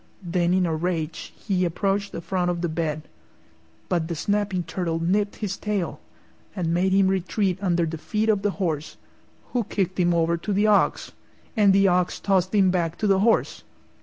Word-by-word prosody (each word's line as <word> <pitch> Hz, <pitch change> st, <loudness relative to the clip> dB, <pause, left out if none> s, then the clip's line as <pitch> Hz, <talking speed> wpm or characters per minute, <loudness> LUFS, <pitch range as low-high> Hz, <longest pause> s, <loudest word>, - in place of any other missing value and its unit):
Then 175 Hz, 0 st, 0 dB
in 185 Hz, 0 st, +3 dB
a 165 Hz, -, -1 dB
rage 165 Hz, -1 st, -3 dB
he 190 Hz, -4 st, -1 dB
approached 195 Hz, +3 st, -1 dB
the -, -, -6 dB
front 180 Hz, 0 st, -1 dB
of 175 Hz, -1 st, -2 dB
the 175 Hz, -, 0 dB
bed; 155 Hz, -1 st, -2 dB, 0.8 s
but 170 Hz, -3 st, 0 dB
the 170 Hz, -, -3 dB
snapping 200 Hz, +1 st, -1 dB
turtle 165 Hz, 0 st, -2 dB
nipped 200 Hz, +5 st, 0 dB
his 200 Hz, -3 st, -4 dB
tail 205 Hz, -4 st, -2 dB, 0.6 s
and 170 Hz, -4 st, -1 dB
made 185 Hz, +2 st, +2 dB
him 195 Hz, 0 st, +4 dB
retreat 190 Hz, 0 st, 0 dB
under 175 Hz, -3 st, +1 dB
the 165 Hz, 0 st, -5 dB
feet 215 Hz, +6 st, -1 dB
of 210 Hz, -3 st, +2 dB
the 205 Hz, -, +1 dB
horse, 160 Hz, -6 st, -2 dB, 0.6 s
who 245 Hz, -2 st, +1 dB
kicked 190 Hz, -3 st, -2 dB
him 175 Hz, -1 st, +3 dB
over 170 Hz, 0 st, +2 dB
to 190 Hz, +5 st, -4 dB
the 205 Hz, +2 st, +2 dB
ox, 210 Hz, -2 st, +2 dB, 0.4 s
and 205 Hz, -3 st, +5 dB
the 195 Hz, 0 st, +4 dB
ox 180 Hz, -1 st, +1 dB
tossed 190 Hz, 0 st, +1 dB
him 190 Hz, -3 st, +4 dB
back 170 Hz, -3 st, -1 dB
to -, -, -2 dB
the 195 Hz, -2 st, +3 dB
horse. 225 Hz, +3 st, +2 dB
185 Hz, 190 wpm, -24 LUFS, 170-200 Hz, 0.8 s, and